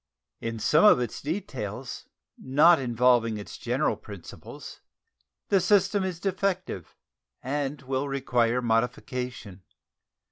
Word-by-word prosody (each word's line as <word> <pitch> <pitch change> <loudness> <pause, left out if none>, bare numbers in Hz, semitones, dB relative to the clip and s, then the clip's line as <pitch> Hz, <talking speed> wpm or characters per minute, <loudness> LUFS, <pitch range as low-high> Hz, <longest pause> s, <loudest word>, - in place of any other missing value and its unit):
In 115 0 -4
some 150 +8 +3
of 210 - +7
its 120 -3 -4
details, 135 - -5 0.3
not 150 +6 +5
involving 120 -2 +2
its 105 - -8
general 125 +1 0
principles, 100 -4 -11 0.7
the 195 - +4
system 200 +1 +3
is 185 -3 -3
defective 195 0 -2 0.5
and 140 +2 -2
will 135 +2 -2
require 125 -3 +1
modification. 120 -3 -2
125 Hz, 105 wpm, -27 LUFS, 115-155 Hz, 0.7 s, of